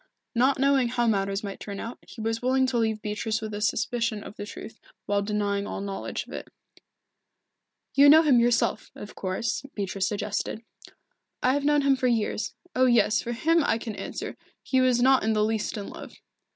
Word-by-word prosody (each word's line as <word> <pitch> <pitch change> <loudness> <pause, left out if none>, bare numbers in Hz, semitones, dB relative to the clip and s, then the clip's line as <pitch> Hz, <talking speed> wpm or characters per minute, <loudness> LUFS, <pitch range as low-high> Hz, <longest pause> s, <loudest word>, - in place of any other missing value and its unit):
Not 260 +3 +3
knowing 270 -2 +3
how 240 0 0
matters 195 -2 0
might 200 -1 -6
turn 200 -1 -6
out, 230 +2 -6
he 225 - -10
was 225 +1 -1
willing 260 +1 +2
to 255 -2 0
leave 220 -1 -1
Beatrice 215 +1 -2
with 215 -1 -6
a 205 - -4
suspicion 215 0 0
of - - -10
the 205 - -7
truth, 220 - -9 0.3
while 205 0 +1
denying 205 -1 -1
all - - -4
knowledge 195 0 -4
of - - -12
it. - - -6 1.5
"You 280 +1 +7
know 315 +2 +8
him 275 -6 +5
yourself, 235 -2 +1
of 205 - -9
course," 185 +5 -2
Beatrice 195 -2 -1
suggested. 210 +2 -3 0.8
"I 255 - +4
have 285 0 -1
known 295 -1 +3
him 275 -1 +4
for 255 -1 0
years 225 -2 -1 0.2
oh, 255 0 +4
yes, 235 -2 +3
for 240 - -4
him, 325 +7 +2
I 225 - +2
can 225 -1 -6
answer. - - -6 0.3
He 260 -1 +2
was 250 -1 +3
not 265 0 +5
in 220 0 +2
the 210 -1 +2
least 220 0 -1
in 200 - -5
love." - - -9
225 Hz, 195 wpm, -26 LUFS, 210-255 Hz, 1.5 s, know